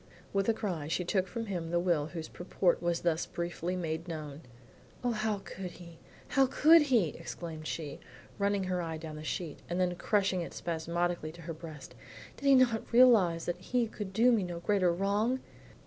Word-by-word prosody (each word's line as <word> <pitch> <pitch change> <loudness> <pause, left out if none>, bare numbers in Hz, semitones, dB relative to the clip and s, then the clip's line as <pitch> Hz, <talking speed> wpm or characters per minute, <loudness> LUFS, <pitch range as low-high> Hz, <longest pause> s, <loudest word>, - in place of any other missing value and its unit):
With 195 +2 +1
a - - +5
cry 175 -10 -3
she 175 +3 -1
took 190 +1 +1
from 230 +5 -4
him 175 -5 -3
the 175 +1 +1
will 170 -4 +1
whose 160 -1 -6
purport 175 0 0
was 175 -1 0
thus 170 -2 0
briefly 175 +1 -3
made 165 -1 -3
known. 155 -3 -6 0.6
"O, 245 - +2
how 215 -2 -1
could 185 -2 -7
he, 170 -2 -13 0.3
how 270 0 +4
could 315 +5 +6
he?" 240 - +3
exclaimed 165 -1 -7
she, 150 -4 -5 0.4
running 200 -1 +1
her 185 -1 -1
eye 165 -1 -4
down 155 -1 -7
the 155 - -8
sheet, 160 -1 -4
and 175 +1 -1
then 180 -1 +2
crushing 190 0 +1
it 170 - -6
spasmodically 170 0 -2
to 170 0 -12
her 165 +1 -5
breast. 155 -3 -10 0.4
"Did 280 - -4
he 275 - +8
not 240 -4 +3
realize 220 -9 +5
that 175 0 -2
he 245 +4 +1
could 210 -3 -6
do 230 +5 +4
me 225 -3 +3
no 175 -2 -4
greater 185 -1 +2
wrong?" 205 +8 +1
175 Hz, 195 wpm, -31 LUFS, 165-210 Hz, 0.6 s, he